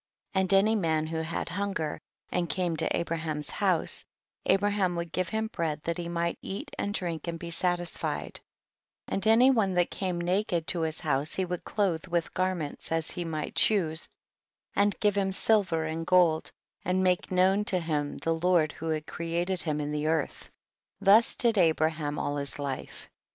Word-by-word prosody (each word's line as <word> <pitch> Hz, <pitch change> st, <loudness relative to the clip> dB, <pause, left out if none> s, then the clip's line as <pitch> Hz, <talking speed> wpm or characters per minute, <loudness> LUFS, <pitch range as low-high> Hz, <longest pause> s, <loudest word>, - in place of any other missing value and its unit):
1.3. 190 Hz, -, +2 dB
And 190 Hz, +1 st, +1 dB
any 210 Hz, +3 st, +4 dB
man 160 Hz, -6 st, +1 dB
who 160 Hz, +1 st, -4 dB
had 160 Hz, +1 st, -3 dB
hunger 185 Hz, -4 st, -2 dB, 0.3 s
and 175 Hz, -2 st, 0 dB
came 180 Hz, -3 st, 0 dB
to -, -, 0 dB
Abraham's 160 Hz, -3 st, -3 dB
house, -, -, +1 dB, 0.5 s
Abra 205 Hz, +1 st, +4 dB
ham 190 Hz, -4 st, +1 dB
would 170 Hz, -1 st, -4 dB
give 185 Hz, 0 st, -1 dB
him 220 Hz, 0 st, -1 dB
bread 160 Hz, -8 st, -2 dB
tiiat 170 Hz, 0 st, -2 dB
he 170 Hz, -1 st, -4 dB
might 170 Hz, 0 st, -1 dB
eat 195 Hz, -, -6 dB
and 200 Hz, -, -1 dB
drink 170 Hz, -5 st, -3 dB
and 170 Hz, 0 st, -3 dB
be 170 Hz, 0 st, -7 dB
satisfied, 175 Hz, 0 st, -2 dB, 0.7 s
and 195 Hz, -, -1 dB
any 240 Hz, +4 st, +7 dB
one 200 Hz, -7 st, +1 dB
that 175 Hz, -1 st, +2 dB
came 185 Hz, -3 st, -2 dB
naked 175 Hz, -1 st, 0 dB
to 170 Hz, -1 st, 0 dB
his 160 Hz, -1 st, -2 dB
house 145 Hz, 0 st, 0 dB
he 190 Hz, -, 0 dB
would 180 Hz, -1 st, -4 dB
clothe 190 Hz, -6 st, -1 dB
with 170 Hz, -1 st, -1 dB
garments 185 Hz, -7 st, -2 dB
as 165 Hz, -1 st, 0 dB
he 175 Hz, -, -4 dB
might 155 Hz, -2 st, -4 dB
choose, 165 Hz, -7 st, +2 dB, 0.7 s
and 205 Hz, 0 st, +2 dB
give 205 Hz, -1 st, +2 dB
him 195 Hz, -1 st, +1 dB
silver 190 Hz, -5 st, +2 dB
and 160 Hz, +1 st, -4 dB
gold 175 Hz, -3 st, +3 dB, 0.3 s
and 185 Hz, +1 st, +1 dB
make 180 Hz, 0 st, +1 dB
known 190 Hz, +3 st, +3 dB
to 190 Hz, -5 st, +3 dB
him 150 Hz, -3 st, -2 dB
the 165 Hz, -, 0 dB
Lord 165 Hz, -2 st, +2 dB
who 165 Hz, +3 st, -6 dB
had 155 Hz, -1 st, -1 dB
created 175 Hz, +3 st, -2 dB
him 150 Hz, -2 st, -1 dB
in 150 Hz, 0 st, -2 dB
the 150 Hz, 0 st, -1 dB
earth; 160 Hz, -2 st, -1 dB, 0.5 s
this 215 Hz, +4 st, +5 dB
did 230 Hz, -4 st, +2 dB
Abraham 155 Hz, -3 st, +1 dB
all 145 Hz, 0 st, -1 dB
his 140 Hz, -1 st, -3 dB
life. 140 Hz, -2 st, -5 dB
170 Hz, 180 wpm, -28 LUFS, 160-190 Hz, 0.7 s, any